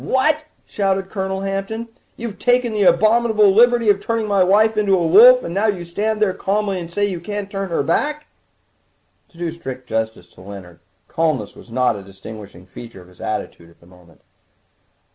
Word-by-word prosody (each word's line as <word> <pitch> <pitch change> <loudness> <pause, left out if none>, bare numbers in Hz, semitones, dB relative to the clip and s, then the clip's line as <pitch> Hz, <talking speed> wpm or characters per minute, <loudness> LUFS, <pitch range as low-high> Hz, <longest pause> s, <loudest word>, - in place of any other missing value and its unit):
"What!" 305 +4 +1 0.2
shouted 195 -1 -2
Colonel 190 -1 -3
Hampton, 195 +4 -4 0.3
"you've 230 -3 -7
taken 245 -2 +1
the 210 - -1
abominable 215 +1 +4
liberty 240 +1 +4
of 200 0 -3
turning 230 -1 -1
my 200 -2 +3
wife 215 +4 +3
into 200 -2 +2
a 170 - 0
wolf, 240 +9 +7
and 170 - -5
now 200 +4 +1
you 185 -5 -2
stand 210 +5 -2
there 210 -3 +1
calmly 200 0 -1
and 170 -1 -8
say 205 +4 0
you 185 -4 -3
can't 205 +2 -6
turn 195 -2 -4
her 165 - -1
back 290 - 0
again!" - - -29 1.1
To - - -19
do 170 -1 -3
strict 130 -6 -8
justice 110 -4 -3
to - - -18
Leonard, 95 -3 -11 0.3
calmness 160 -4 -1
was - - -15
not 125 0 +1
a 100 - -7
distinguishing 100 -1 -12
feature 95 0 -12
of 90 - -19
his 90 - -19
attitude 85 - -5
at 85 - -24
the - - -22
moment. 90 -2 -21
195 Hz, 190 wpm, -19 LUFS, 130-215 Hz, 1.1 s, wolf